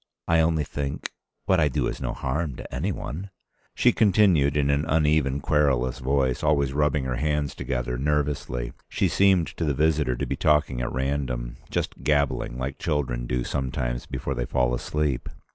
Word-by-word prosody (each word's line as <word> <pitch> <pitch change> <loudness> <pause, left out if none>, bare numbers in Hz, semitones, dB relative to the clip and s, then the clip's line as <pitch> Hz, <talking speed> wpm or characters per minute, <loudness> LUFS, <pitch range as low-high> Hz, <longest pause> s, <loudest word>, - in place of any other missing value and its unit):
I 85 0 +4
only 80 -1 +2
think. 70 0 -4 0.3
What 95 -2 +3
I 75 - +4
do 65 - 0
is - - -3
no - - -2
harm 70 +1 -2
to - - -9
any 80 +11 -1
one."... 90 +3 -5 0.5
She - - +4
continued 95 -9 +4
in 70 -1 +2
an 70 +1 +1
uneven 75 -3 +2
querulous 65 -5 +1
voice, 65 -1 +1
always 70 -3 +2
rubbing 75 -1 +1
her 65 -2 -2
hands 75 0 0
together 60 -2 -3
nervously. 70 -4 -1 0.2
She - - +1
seemed 95 -4 +3
to - - -1
the 75 -3 0
visitor 75 -3 +2
to - - -2
be - - -2
talking 75 -4 +2
at - - -2
random, 65 -3 -2
just - - -3
gabbling, 70 -4 0
like 65 +2 -4
children 65 -7 -1
do 60 0 -1
sometimes 60 -2 -2
before 70 - -3
they - - -2
fall 60 -1 +1
asleep. 75 +1 -1
70 Hz, 175 wpm, -25 LUFS, 65-75 Hz, 0.5 s, I